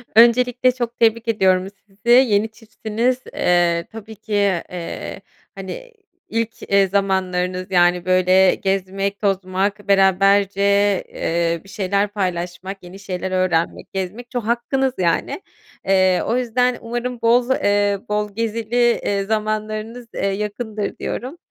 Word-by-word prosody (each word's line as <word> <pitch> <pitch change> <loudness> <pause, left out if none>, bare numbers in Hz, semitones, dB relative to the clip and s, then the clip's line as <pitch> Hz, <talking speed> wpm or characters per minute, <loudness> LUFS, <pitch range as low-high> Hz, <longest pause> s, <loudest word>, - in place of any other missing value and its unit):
Öncelikle 245 +2 +5
çok 240 -1 -4
tebrik 230 0 +2
ediyorum 190 -4 +2 0.2
sizi. 205 +4 -8
Yeni 225 -4 +5
çiftsiniz, 225 +3 -2
eee, 175 -1 +2
tabii 220 0 -10
ki, 215 +1 -8 0.4
eee, 170 -2 -6 0.3
hani, - - -7
iii, - - -9 0.5
ilk, 230 0 -7
eee, 200 -1 +3
zamanlarınız. 185 -1 -1
Yani, 175 -1 +3
böyle, 185 +1 +4
gezmek, 195 +1 -2
tozmak 195 +1 -1
beraberce, 195 0 +3 0.5
eee, 170 0 -1
bir 195 - -17
şeyler 200 +1 0
paylaşmak, 185 -1 -4
yeni 180 +2 -11
şeyler 190 -1 -4
öğrenmek, 185 -3 -1
gezmek 195 +6 -5
ço 245 - -2
hakkınız 245 +4 0
yani. 175 - 0 0.5
Eee, 185 -1 +3
o 240 - 0
yüzden 250 0 +1
umarım 240 +1 -4
boz 240 +2 +3
eee, 205 -4 +2
bol 210 0 -1
gezili, 230 +2 +1
eee, 200 -1 0
zamanlarınız, 215 +2 -3
eee, - - -2
yakındır 210 +1 -3
diyorum. 265 +8 -5
205 Hz, 125 wpm, -20 LUFS, 185-230 Hz, 0.5 s, Öncelikle